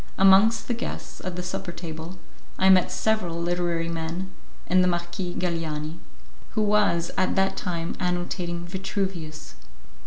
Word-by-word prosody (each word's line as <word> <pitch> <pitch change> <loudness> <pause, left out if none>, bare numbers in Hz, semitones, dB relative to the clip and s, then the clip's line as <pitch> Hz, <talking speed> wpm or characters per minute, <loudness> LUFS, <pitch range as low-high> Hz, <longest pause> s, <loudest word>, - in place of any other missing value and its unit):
Amongst 195 +4 +6
the 245 - +1
guests 235 - -5
at 185 -1 -3
the 180 - -3
supper 180 0 -4
table 170 +1 -7 0.4
I 190 - +5
met 185 -1 +5
several 185 -7 0
literary 170 -1 0
men, 170 +3 -3 0.3
and 185 0 +4
the - - +3
Marquis 175 +1 -2
Galiani, 165 -2 -2 0.5
who 215 - +2
was 205 -5 +3
at 185 - +2
that 195 0 +2
time 170 -2 -3
annotating 175 -1 -2
Vitruvius. 185 -4 -4
175 Hz, 135 wpm, -26 LUFS, 170-190 Hz, 0.5 s, Amongst